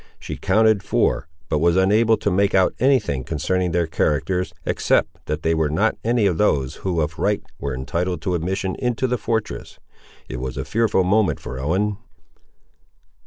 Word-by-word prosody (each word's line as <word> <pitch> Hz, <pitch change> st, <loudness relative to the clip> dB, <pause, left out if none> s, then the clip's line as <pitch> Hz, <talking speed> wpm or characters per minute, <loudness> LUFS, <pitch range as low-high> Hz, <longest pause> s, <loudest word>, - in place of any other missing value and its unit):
She -, -, -6 dB
counted 110 Hz, -2 st, +3 dB
four, 95 Hz, -, 0 dB, 0.2 s
but 75 Hz, -, 0 dB
was 85 Hz, +2 st, +3 dB
unable 110 Hz, +4 st, +4 dB
to 100 Hz, -, -1 dB
make 100 Hz, +2 st, +2 dB
out 95 Hz, -1 st, +4 dB
any 135 Hz, +1 st, +4 dB
thing 70 Hz, -, -3 dB
concerning 90 Hz, +5 st, -1 dB
their 85 Hz, 0 st, +1 dB
characters, 80 Hz, +4 st, 0 dB
except -, -, 0 dB
that 75 Hz, +1 st, -3 dB
they 80 Hz, -, +2 dB
were 80 Hz, -2 st, +1 dB
not 100 Hz, +9 st, +1 dB
any 115 Hz, -1 st, +2 dB
of 90 Hz, -5 st, +1 dB
those 70 Hz, -11 st, +1 dB
who 90 Hz, -4 st, -1 dB
of 80 Hz, +1 st, -3 dB
right 105 Hz, 0 st, +1 dB, 0.2 s
were 70 Hz, -2 st, -3 dB
entitled 85 Hz, +7 st, -2 dB
to 90 Hz, -, -1 dB
admission 95 Hz, +3 st, -2 dB
into 125 Hz, 0 st, 0 dB
the 125 Hz, -1 st, 0 dB
fortress. 105 Hz, -, -3 dB, 0.5 s
It 65 Hz, -, -6 dB
was 65 Hz, 0 st, -5 dB
a -, -, -3 dB
fearful 110 Hz, -4 st, +2 dB
moment 100 Hz, +2 st, +2 dB
for 60 Hz, +1 st, -7 dB
Ellen. 95 Hz, +9 st, 0 dB
90 Hz, 175 wpm, -22 LUFS, 80-105 Hz, 0.5 s, unable